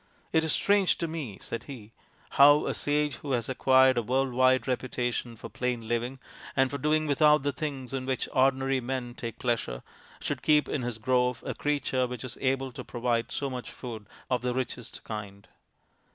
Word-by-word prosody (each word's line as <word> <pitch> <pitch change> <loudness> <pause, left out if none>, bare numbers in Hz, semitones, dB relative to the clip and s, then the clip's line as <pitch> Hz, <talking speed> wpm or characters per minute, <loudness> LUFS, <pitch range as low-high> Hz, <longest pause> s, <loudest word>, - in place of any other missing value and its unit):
"It 160 - +4
is 160 - 0
strange 200 +1 +3
to 170 - -2
me," 150 -11 -5
said 115 - -5
he, 115 -6 -10 0.2
" - - -31
how 145 +2 +8
a - - -1
sage 150 0 0
who 140 -2 -4
has 120 -2 0
acquired 130 -1 +4
a - - +1
world 130 +3 0
wide 130 +1 +3
reputation 125 -2 -2
for 110 - -9
plain 125 -3 -3
living, 120 +3 -1 0.4
and 130 0 +3
for 140 - -3
doing 155 +2 +2
without 150 0 +4
the 145 - +1
things 140 -4 -5
in 130 -1 -3
which 130 -1 -1
ordinary 135 0 +3
men 125 -1 -3
take 115 -2 -6
pleasure, 115 - -2 0.4
should - - -3
keep 150 -1 +4
in 140 - -2
his 120 -2 -3
grove 125 +1 +1
a - - -2
creature 135 -3 0
which 125 0 -6
is 130 - -6
able 135 0 0
to - - -8
provide 120 -1 -1
so 140 - -2
much 125 -2 -5
food 110 -5 -8 0.2
of 125 -2 0
the 125 0 -1
richest 125 -2 -4
kind. 100 -2 -7
130 Hz, 195 wpm, -28 LUFS, 120-140 Hz, 0.4 s, how